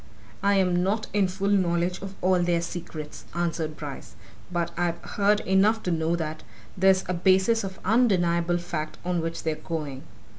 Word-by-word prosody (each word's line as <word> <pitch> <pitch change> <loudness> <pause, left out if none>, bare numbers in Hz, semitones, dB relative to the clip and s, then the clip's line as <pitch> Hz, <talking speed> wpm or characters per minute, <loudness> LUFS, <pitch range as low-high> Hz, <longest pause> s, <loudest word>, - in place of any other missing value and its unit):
"I'm 190 -3 +3
not 205 +4 0
in 205 -2 +3
full 195 +2 -1
knowledge 180 -2 +1
of 195 0 -7
all 185 0 +3
their 175 -1 +2
secrets," 165 -3 -7
answered 165 -2 -2
Bryce, 145 -3 -8 0.4
"but 170 -1 -1
I've 175 -1 0
heard 205 +1 +2
enough 205 +4 +3
to 180 - -1
know 165 0 +1
that 155 -2 -4 0.3
there's 190 0 +4
a 185 - 0
basis 190 +5 +3
of 190 -1 -5
undeniable 175 -6 +3
fact 155 -3 -4
on 180 -1 0
which 165 0 -4
they're 160 - 0
going. 150 -4 -5
175 Hz, 160 wpm, -26 LUFS, 165-190 Hz, 0.4 s, there's